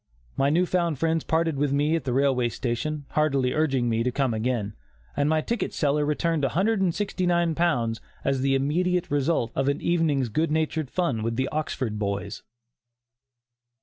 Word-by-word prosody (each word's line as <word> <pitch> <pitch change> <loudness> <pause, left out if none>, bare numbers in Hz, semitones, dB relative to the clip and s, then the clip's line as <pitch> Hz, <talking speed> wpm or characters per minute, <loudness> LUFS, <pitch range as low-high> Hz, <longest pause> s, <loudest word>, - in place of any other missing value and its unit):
My 135 +1 +2
new 170 +5 +3
found 170 -4 0
friends 165 +2 0
parted 160 -2 0
with 145 0 +1
me 145 +3 +2
at 165 - -3
the 130 - -1
railway 130 -2 +2
station, 135 +6 -3
heartily 140 -4 +1
urging 135 -6 +1
me 115 -1 +1
to 125 +2 0
come 130 -2 0
again, 110 -2 -1 0.4
and 145 +1 +1
my 155 0 +2
ticket 235 +7 -3
seller 150 0 +1
returned 160 0 0
£169 175 - +1 0.3
as 135 -1 +1
the 135 0 +2
immediate 175 +6 0
result 145 -4 +1
of 135 - 0
an 140 +2 -1
evening's 155 -7 +1
good 155 +9 0
natured 155 -2 -1
fun 165 -11 -1
with 115 +1 -2
the 130 +2 0
Oxford 130 -8 -3
boys. 100 -1 -3
145 Hz, 160 wpm, -25 LUFS, 130-165 Hz, 0.4 s, new